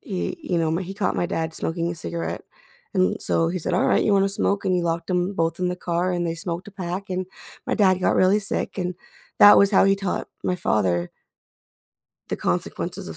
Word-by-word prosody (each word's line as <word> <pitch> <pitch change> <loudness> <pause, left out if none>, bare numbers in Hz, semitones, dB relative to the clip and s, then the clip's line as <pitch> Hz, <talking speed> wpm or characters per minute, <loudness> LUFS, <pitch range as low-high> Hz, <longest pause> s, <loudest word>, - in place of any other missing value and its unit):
he, 195 - -4
you 175 - -1
know, 160 -1 +1
my 170 +4 -1
he 190 +2 -7
caught 200 -2 -1
my 175 - 0
dad 160 0 -2
smoking 170 +1 -2
a - - -4
cigarette, 170 +1 -4 0.5
and 185 -1 +1
so 165 0 +2
he 180 +2 -2
said, 175 - -2
"Alright, - - +2
you 210 - +2
wanna 195 0 +3
smoke?" 200 0 0
and 185 - +1
he 180 - +1
locked 170 +1 -2
them 180 +2 0
both 165 -1 -1
in 180 - +1
the 180 - -3
car 180 +1 -1
and 175 -1 -1
they 165 - -2
smoked 175 +1 -4
a - - -13
pack 190 +1 -5
and 185 0 -2 0.4
my - - 0
dad 190 -3 +3
got - - +2
really 185 +3 +4
sick, 195 - -1
and 180 0 -2 0.5
that 205 - +9
was 200 - +5
how 195 - +6
he 195 0 +3
taught 195 -2 -3 0.2
my 180 - +1
father 90 - 0 1.2
the - - -2
consequences - - -3
of 80 - -8
180 Hz, 225 wpm, -23 LUFS, 170-195 Hz, 1.2 s, that